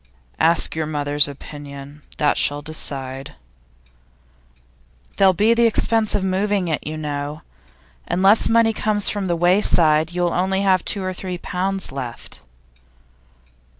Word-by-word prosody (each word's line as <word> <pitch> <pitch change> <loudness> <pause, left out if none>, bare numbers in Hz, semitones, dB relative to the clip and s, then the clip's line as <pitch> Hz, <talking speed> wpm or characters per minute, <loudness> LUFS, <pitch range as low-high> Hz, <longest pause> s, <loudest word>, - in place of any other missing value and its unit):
'Ask 165 0 +3
your 160 -1 -2
mother's 145 -1 0
opinion. 145 0 -10 0.2
That 150 - +2
shall 145 0 0
decide.' 135 -3 -5 1.8
'There'll 195 -1 +5
be 215 +5 +3
the 235 0 +3
expense 225 -1 +1
of 190 - -1
moving 190 -1 0
it, 155 - -2
you 155 +1 -5
know. 150 0 -5 0.6
Unless 195 +4 +3
money 225 0 +3
comes 210 -1 +1
from 205 -2 -3
The 175 - 0
Wayside, 170 -3 +3
you'll 175 -1 -1
only 190 +2 0
have 185 -2 +2
two 200 - -1
or 185 0 -3
three 180 0 -6
pounds 190 +1 -2
left. 125 - -8
175 Hz, 130 wpm, -20 LUFS, 150-195 Hz, 1.8 s, There'll